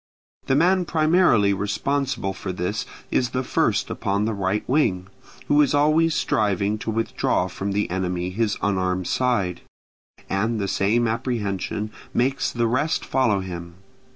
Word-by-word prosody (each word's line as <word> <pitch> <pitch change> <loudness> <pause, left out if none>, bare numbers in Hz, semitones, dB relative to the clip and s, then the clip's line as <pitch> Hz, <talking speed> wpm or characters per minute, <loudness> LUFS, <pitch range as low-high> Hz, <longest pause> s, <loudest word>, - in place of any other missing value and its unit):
The 135 - +3
man 180 +4 +3
primarily 155 - +3
responsible 105 +2 -1
for 95 0 -5
this 90 +4 -3 0.2
is 125 - +1
the 130 - 0
first - - 0
upon 100 +2 -1
the 110 - -1
right 100 +1 -1
wing, 95 -10 +1 0.4
who 145 +1 +5
is 145 -1 +2
always 155 +2 +3
striving 105 0 0
to 115 - -5
withdraw 110 -4 0
from 95 +2 -4
the 105 +1 0
enemy 90 -1 -2
his 105 +1 0
unarmed 95 -2 0
side; 100 -9 0 0.7
and 110 +4 0
the 100 - -1
same 115 +5 +1
apprehension 110 -3 -2 0.2
makes 135 +3 +1
the 120 -1 0
rest 130 +7 0
follow 115 -7 +1
him. 85 -2 -7
105 Hz, 145 wpm, -23 LUFS, 95-130 Hz, 0.7 s, who